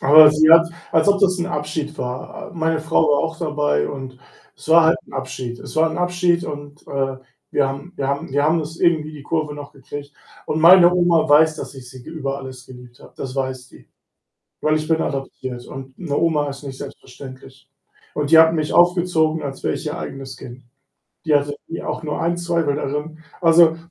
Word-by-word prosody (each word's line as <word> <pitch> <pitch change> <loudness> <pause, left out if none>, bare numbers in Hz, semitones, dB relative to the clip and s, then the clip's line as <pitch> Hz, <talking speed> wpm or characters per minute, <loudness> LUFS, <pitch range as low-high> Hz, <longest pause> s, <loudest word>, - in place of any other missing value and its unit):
Aber 150 +2 +8
sie 155 +1 +4
hat 165 0 +7 0.2
als 160 +3 +3
ob 200 0 +3
das 185 -2 +3
'n 175 - -2
Abschied 150 -2 -4
war. 125 +8 -6
Meine 160 -1 0
Frau 160 +1 +1
war 145 -1 +3
auch 165 0 -3
dabei 150 - 0
und 130 -2 -8 0.4
es - - -15
war 165 0 +6
halt 160 +1 +3
'n - - -18
Abschied. 130 -2 -5
Es - - -10
war 160 +1 +2
'n 160 - -5
Abschied 175 -1 +1
und, 145 0 -9
äh, 135 -1 -2 0.3
wir 140 - +2
haben 140 +6 -7
wir 135 - -2
haben 140 0 -3
wir 145 +2 +1
haben 160 +3 +2
uns 160 +2 -7
irgendwie 160 -3 +1
die 150 -2 -10
Kurve 155 0 -2
noch 145 -1 -10
gekriegt. 140 +2 -9 0.3
Und 155 - -2
meine 175 +1 +8
Oma 175 -3 +3
weiß, 155 +1 +5
dass - - -8
ich 130 -2 -11
sie 130 0 -12
ge - - -11
über 140 -4 -3
alles 130 -2 -10
geliebt 125 -1 -14
habe. - - -16
Das 130 -1 -6
weiß 130 -2 -4
die. - - -19 0.7
Weil 155 0 +1
ich 155 0 -3
bin 160 0 +1
adoptiert 130 -2 -5
und 135 0 -10
'ne 160 -6 -3
Oma 150 -3 +1
ist 140 0 -8
nicht 135 -2 -8
selbstverständlich 130 -2 -12 0.5
und 150 -1 -2
die 165 - +8
hat 160 0 +7
mich 155 -1 -2
aufgezogen, 175 -3 +2
als 135 -2 -7
wäre - - 0
ich - - -7
ihr - - -4
eigenes 135 -2 -7
Kind. 125 0 -11 0.6
Die 155 -2 +2
hatte 145 0 +1
nie, 165 - -6
auch - - -5
nur 150 - -3
einen 170 +1 0
Zweifel 170 -4 -1
darin. 150 +2 -4 0.2
Also, 165 -1 +5
150 Hz, 210 wpm, -20 LUFS, 135-165 Hz, 0.7 s, Aber